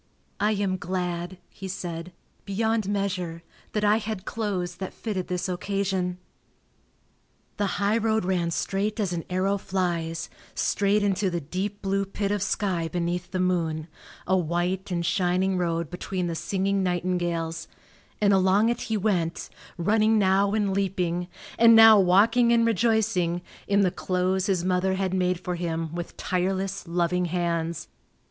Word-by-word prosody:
"I 210 +2 +2
am 195 -2 0
glad," 180 0 -3
he 195 - -9
said, 175 -2 -5 0.3
"beyond 220 +1 0
measure, 185 -5 -2 0.3
that 210 - 0
I 210 +1 +4
had 215 -3 -4
clothes 185 -5 -3
that 190 0 -6
fitted 195 -5 -3
this 180 0 -2
occasion." 185 -1 -1 1.4
The 205 -1 +1
highroad 220 0 +1
ran 180 -2 0
straight 200 +5 -1
as 195 -4 0
an 165 -1 -3
arrow 190 +2 0
flies, 170 -4 -2 0.3
straight 205 +1 +1
into 195 -1 +1
the 175 -1 -2
deep 190 +7 -4
blue 195 0 +1
pit 200 0 -2
of 205 -1 0
sky 185 -4 0
beneath 175 +2 -2
the 185 - -3
moon, 165 -4 0 0.4
a 185 - +2
white 180 +2 -1
and 170 -2 -1
shining 180 +2 +1
road 170 -2 -1
between 180 0 -3
the 170 - -2
singing 195 +4 0
nightingales, 175 -2 -1 0.5
and 205 -1 +4
along 190 +3 +4
it 235 - -1
he 220 - -1
went, 180 -5 -1 0.3
running 215 +5 +3
now 195 0 +3
and 205 -3 +1
leaping, 180 -3 -1 0.3
and 230 0 +8
now 225 -1 +9
walking 220 +6 +4
and 230 -1 +4
rejoicing, 220 -6 +1 0.2
in 200 0 +3
the 185 -2 +3
clothes 185 +1 0
his 185 -3 0
mother 185 +1 +1
had 190 -1 -1
made 180 -1 +1
for 180 0 -4
him 165 -2 -3
with 175 0 -6
tireless, 190 +1 -1
loving 175 +1 +1
hands. 170 -1 -2
185 Hz, 150 wpm, -26 LUFS, 175-200 Hz, 1.4 s, now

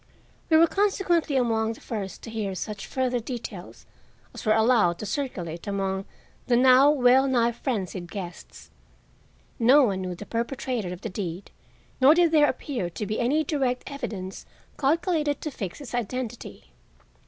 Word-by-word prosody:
We 320 - +6
were 330 - +7
consequently 350 -5 +1
among 225 -3 +1
the - - -14
first 200 -6 -6
to 225 - -8
hear 210 -4 -3
such 200 +1 -5
further 255 -2 0
details 225 -6 -7 0.5
as - - -8
were 215 - +5
allowed 220 -6 +3
to 215 - -6
circulate 185 - -4
among 195 -1 -2 0.4
the 245 - +3
now 260 +2 +7
well 265 -2 +4
nigh 240 -3 +2
frenzied 195 -8 -4
guests. 180 -3 -9 0.9
No 260 +5 +6
one 195 -6 0
knew 180 -1 -4
the 205 - -9
perpetrator 235 -3 -3
of 180 - -7
the 225 - -4
deed 180 -1 -5 0.5
nor 280 +4 +7
did 345 -2 +4
there 300 -2 +5
appear 245 - -3
to 170 +4 -5
be 215 +2 -3
any 285 +6 +2
direct 270 -4 -1
evidence 195 -9 -6 0.3
calculated 305 0 +1
to 305 - -4
fix 195 -9 -6
his 280 -4 -10
identity. 240 0 -5
235 Hz, 155 wpm, -26 LUFS, 195-275 Hz, 0.9 s, were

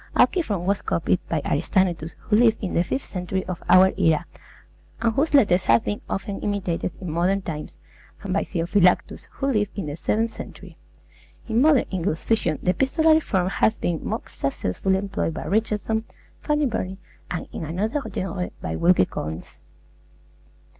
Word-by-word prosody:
Alciphron 210 - +2
was 200 +1 +1
copied - - 0
by - - -1
Aristaenetus, 175 -5 0
who 210 - +1
lived 225 0 +5
in 190 - -2
the 170 - +3
fifth 265 +9 -2
century 185 0 -3
of 185 -2 -5
our 190 +1 +7
era, 160 -5 +3 0.7
and 230 -1 +1
whose 290 +5 +1
letters 195 -9 +4
have 115 0 +4
been 105 0 -2
often 195 0 -3
imitated 190 -4 -1
in 180 -4 -5
modern 185 +4 +1
times, 150 -4 -6 0.5
and 195 -2 -2
by 200 - +1
Theophylactus, 180 +1 +1
who 275 - -3
lived 215 -7 0
in 195 - -2
the 145 -1 -4
seventh 220 +7 0
century. - - -10 0.7
In 230 +1 +2
modern 290 -3 +5
English 175 -3 -2
fiction 170 -9 +1
the 180 - +3
epistolary 315 - +3
form 190 - 0
has 220 +3 +2
been 170 -3 -1
most - - -4
successfully 135 - -1
employed 195 -4 -2
by - - -5
Richardson, 220 +1 0 0.3
Fanny 300 -1 +1
Burney, 195 -6 -2 0.3
and, 175 - -4
in - - -5
another 205 - -1
genre, 185 -1 -3
by 80 - -4
Wilkie 175 - +4
Collins. 80 0 -7
190 Hz, 160 wpm, -24 LUFS, 175-220 Hz, 0.7 s, our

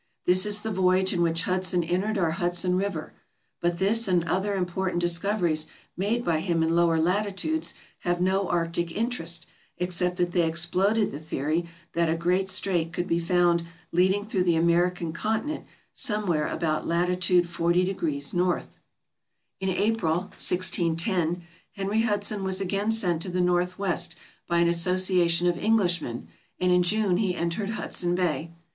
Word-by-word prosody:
This 185 +3 +3
is 210 0 -1
the 220 - -3
voyage 190 0 +2
in 175 - 0
which 165 0 +2
Hudson 185 -1 0
entered 185 +6 -1
our 170 -4 +1
Hudson 175 +1 0
River; 200 +2 -3 0.5
but 175 0 0
this 215 +5 +2
and 180 -3 +2
other 190 +4 -1
important 180 -1 -1
dis 175 -1 0
coveries 170 -6 0 0.3
made 220 +6 -1
by 165 -2 +1
him 165 -1 0
in 165 +1 +1
lower 170 -1 +3
latitudes 205 - 0 0.2
have 175 0 -1
no 190 +1 +1
arctic 170 0 -1
interest, 210 -6 -3 0.3
except 180 0 -1
that 175 -1 0
they 175 - +2
exploded 185 +6 +1
the 145 - -6
theory 155 +2 -2 0.3
that 170 -1 +1
a 165 - +1
great 180 +3 +1
strait 180 -3 0
could 175 +1 -2
be 170 -1 0
found 170 0 +2 0.3
leading 190 +4 +2
through 195 -4 0
the 170 -2 +3
American 170 0 +1
continent 220 - -2 0.3
somewhere 210 - 0
about 155 -2 -1
lat. 180 +2 0
400 175 0 +2
N. 170 -1 -1 1.1
In 190 0 -1
April, 195 -3 +1
1610, 175 -1 +1 0.3
Henry 200 +3 0
Hudson 205 -2 -1
was 190 0 +1
again 200 +3 0
sent 180 -7 +2
to 185 - -3
the 180 +1 -2
North 180 0 +1
west 175 -3 0 0.3
by 170 - +1
an 170 0 +4
association 175 0 +2
of 175 -1 +1
Englishmen, 175 - 0 0.3
and 180 0 +2
in 180 0 +5
June 195 0 +1
he 190 -3 0
entered 170 +5 -2
Hudson 175 -1 -1
Bay. 170 -2 -1
180 Hz, 155 wpm, -26 LUFS, 170-195 Hz, 1.1 s, in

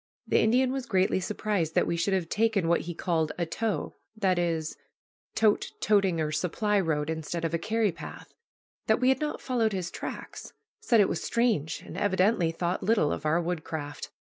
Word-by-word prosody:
The - - +3
Indian 250 +3 +3
was 265 -2 -3
greatly 190 -1 +2
surprised 190 -3 -2
that - - +4
we - - -1
should 190 +3 +1
have 180 -3 -1
taken 215 -3 +1
what 170 - +3
he 175 0 -6
called 160 -3 0
a 175 - 0
"tow," 215 +6 -3 0.2
that 190 -4 +2
is, 165 -2 -1 0.6
tote, 215 -2 +2
toting, 195 -5 +2
or 155 -1 0
supply, 195 +7 0
road 155 -5 0
instead 160 +1 -3
of 165 - -2
a 165 - +1
carry 220 +3 +1
path, 170 - -10 0.5
that 220 - +3
we 255 +1 +3
had 265 0 +3
not 300 0 -2
followed 230 -4 0
his 185 -2 -3
tracks, - - -7 0.3
said 230 - +3
it 195 - +4
was - - -2
"strange," 215 - 0
and - - -7
evidently 190 -2 +2
thought 175 +2 -2
little 210 -9 +2
of - - -3
our 160 +3 +3
woodcraft. 160 -4 -4
185 Hz, 190 wpm, -28 LUFS, 165-220 Hz, 0.6 s, that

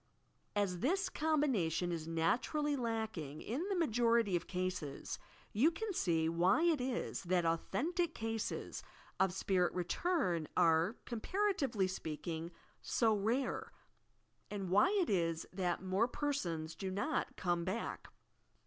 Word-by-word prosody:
As 195 -4 +1
this 375 - +1
combination 235 - +1
is 165 -2 -3
naturally 255 - +1
lacking, 220 - -3
in 295 - -2
the 395 - +1
majority 235 - +3
of 175 - -2
cases, 180 -6 -3 0.3
you 250 +10 +5
can 405 +5 -4
see 165 - +2
why 175 - +3
it 330 -6 +3
is 250 -1 -2
that 175 -1 +2
au 165 0 +3
thentic 345 +3 0
cases 225 0 -3 0.4
of 190 -1 +4
spirit 185 -1 +1
return 180 - 0
are, 165 +6 +4
comparatively 270 - 0
speaking, 165 -2 -4 0.5
BO 225 -2 +5
rare 230 +6 -1 0.8
and 195 -3 -4
why 205 - +6
it - - -3
is 165 -4 +1
that 180 -1 -1
more 190 +5 +2
persons 175 - -2
do 190 +4 -4
not 195 +2 -1
"come 175 -2 0
back." 190 +6 -3
200 Hz, 130 wpm, -36 LUFS, 175-270 Hz, 0.8 s, why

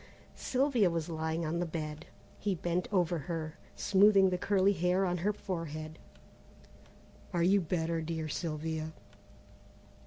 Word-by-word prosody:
Sylvia 255 -7 +2
was 165 -1 -2
lying 160 0 -2
on 165 +2 -1
the 175 - 0
bed. 155 -2 -5 0.3
He 200 -2 0
bent 175 +1 -1
over 175 -4 +2
her, 155 +1 -5 0.2
smoothing 195 -1 +5
the 180 - +1
curly 200 0 +3
hair 180 +1 +2
on 180 -1 0
her 200 +5 +1
forehead. 160 -6 -5 1.3
"Are 170 -1 +2
you 195 +3 +4
better, 165 -1 -1
dear 160 0 -3
Sylvia?" 160 0 -3
170 Hz, 130 wpm, -32 LUFS, 160-190 Hz, 1.3 s, smoothing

